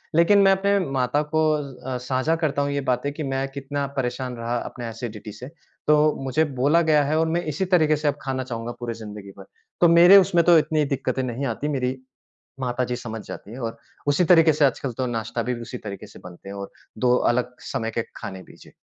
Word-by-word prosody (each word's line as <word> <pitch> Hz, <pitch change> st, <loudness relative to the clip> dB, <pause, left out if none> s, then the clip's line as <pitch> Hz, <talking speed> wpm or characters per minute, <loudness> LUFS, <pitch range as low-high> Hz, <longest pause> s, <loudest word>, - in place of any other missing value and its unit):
लेकिन 170 Hz, +5 st, +5 dB
मैं 195 Hz, 0 st, +6 dB
अपने 200 Hz, +1 st, +2 dB
माता 135 Hz, +1 st, +1 dB
को 155 Hz, 0 st, +3 dB
अ 135 Hz, -3 st, -5 dB
अ, -, -, -1 dB
साझा 130 Hz, +5 st, 0 dB
करता 155 Hz, -4 st, -1 dB
हूँ 140 Hz, 0 st, -1 dB
ये 140 Hz, 0 st, -1 dB
बातें 125 Hz, +3 st, -1 dB
कि 155 Hz, +1 st, -5 dB
मैं 135 Hz, -1 st, -2 dB
कितना 140 Hz, +1 st, -3 dB
परेशान 125 Hz, 0 st, -2 dB
रहा 115 Hz, +1 st, -3 dB
अपने 120 Hz, 0 st, -6 dB
एसिडिटी 110 Hz, -2 st, -7 dB
से, 110 Hz, +5 st, -9 dB, 0.4 s
तो 150 Hz, 0 st, +4 dB
मुझे 135 Hz, +4 st, +1 dB, 0.2 s
बोला 150 Hz, +5 st, +4 dB
गया 150 Hz, -1 st, +5 dB
है 150 Hz, +2 st, 0 dB
और 160 Hz, -, +2 dB
मैं 170 Hz, +2 st, 0 dB
इसी 190 Hz, +7 st, -1 dB
तरीके 155 Hz, -3 st, +4 dB
से 150 Hz, +1 st, -2 dB
अब 145 Hz, 0 st, +1 dB
खाना 130 Hz, -1 st, -2 dB
चाहूँगा 120 Hz, -2 st, -5 dB
पूरी 120 Hz, -1 st, -4 dB
ज़िंदगी 105 Hz, -3 st, -9 dB
भर। 95 Hz, -, -11 dB, 0.4 s
तो 175 Hz, -, +7 dB
मेरे 175 Hz, +4 st, +8 dB
उसमें 175 Hz, -3 st, +4 dB
तो 175 Hz, -1 st, +7 dB
इतनी 155 Hz, -1 st, 0 dB
दिक्कतें 130 Hz, 0 st, -2 dB
नहीं 130 Hz, +2 st, -3 dB
आती, 130 Hz, +3 st, -2 dB
मेरी 130 Hz, -3 st, -1 dB, 0.6 s
माताजी 125 Hz, -1 st, -1 dB
समझ 115 Hz, -3 st, -6 dB
जाती 105 Hz, -, -9 dB
है 125 Hz, -, -8 dB
और 115 Hz, -1 st, -4 dB, 0.3 s
उसी 145 Hz, +5 st, +3 dB
तरीके 165 Hz, -2 st, +6 dB
से 150 Hz, 0 st, +3 dB
आजकल 135 Hz, 0 st, -1 dB
तो 130 Hz, -, -1 dB
नाश्ता 115 Hz, 0 st, -3 dB
भी 125 Hz, -, -1 dB
उसी 120 Hz, +2 st, -7 dB
तरीके 105 Hz, -2 st, -8 dB
से 100 Hz, -, -14 dB
बनते 90 Hz, +2 st, -11 dB
हैं 100 Hz, -, -7 dB
और 100 Hz, 0 st, -7 dB, 0.3 s
2 125 Hz, +1 st, +3 dB, 0.2 s
अलग 125 Hz, +1 st, -2 dB, 0.2 s
समय 115 Hz, 0 st, -2 dB
के 115 Hz, -, -1 dB
खाने 95 Hz, -1 st, -7 dB
भी। -, -, -16 dB
जी। -, -, -16 dB
130 Hz, 225 wpm, -23 LUFS, 120-155 Hz, 0.6 s, मेरे